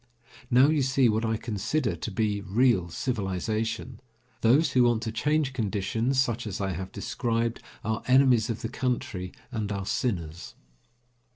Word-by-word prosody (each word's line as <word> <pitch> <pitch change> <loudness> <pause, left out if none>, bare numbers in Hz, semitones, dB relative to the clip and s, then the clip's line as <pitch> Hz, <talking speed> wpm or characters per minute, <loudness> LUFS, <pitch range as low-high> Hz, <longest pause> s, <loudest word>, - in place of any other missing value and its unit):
Now 130 +2 +6
you 155 -2 +2
see 130 -1 +3
what 110 +1 +1
I 110 -1 0
consider 110 - -1
to 85 - -5
be 105 0 0
real 100 -3 +2
civilization. 110 +3 -2 0.4
Those 135 +8 +4
who 125 -1 +4
want 120 -1 +2
to 110 - -2
change 150 +4 0
conditions 110 +3 0
such 120 -3 0
as 100 - -4
I 95 -1 -1
have 95 +2 -5
described 115 +1 -2 0.2
are 110 +1 -1
enemies 130 -4 +5
of 115 - -3
the 115 - -2
country 120 -8 -2 0.2
and 110 -4 -3
are 100 -1 -3
sinners. 90 -8 -3
115 Hz, 155 wpm, -27 LUFS, 100-125 Hz, 0.4 s, Now